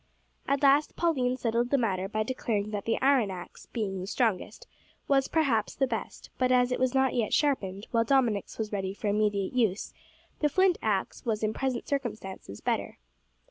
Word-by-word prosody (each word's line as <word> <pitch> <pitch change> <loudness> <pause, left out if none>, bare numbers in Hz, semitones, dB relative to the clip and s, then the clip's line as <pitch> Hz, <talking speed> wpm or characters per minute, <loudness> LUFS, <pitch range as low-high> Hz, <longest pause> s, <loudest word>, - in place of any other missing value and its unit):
At 280 0 +1
last 285 +2 +4
Pauline 255 -7 +1
settled 235 0 0
the 280 - +3
matter 195 -6 0
by 215 +1 0
declaring 215 -4 -2
that 205 -2 -4
the 225 - 0
iron 265 -6 +4
axe, 180 -2 -9
being 200 -5 -3
the 185 - -5
strongest, 230 - -1 0.4
was, 270 -1 +3
perhaps, 265 -10 +1
the 270 - +2
best; 235 -4 -5
but 255 0 +2
as 250 0 +4
it 250 - 0
was 255 0 +1
not 265 0 +3
yet 230 -4 +1
sharpened, 205 -9 0
while 230 -1 +3
Dominick's 230 -5 +1
was 220 -2 -3
ready 195 -1 -2
for 210 - -2
immediate 205 -1 +1
use, 220 -6 0 0.5
the 300 - +2
flint 375 +3 +3
axe 200 -3 -1
was 220 -2 -1
in 215 0 +1
present 260 -1 -2
circumstances 215 - -4
better. - - -2
230 Hz, 180 wpm, -28 LUFS, 205-265 Hz, 0.5 s, last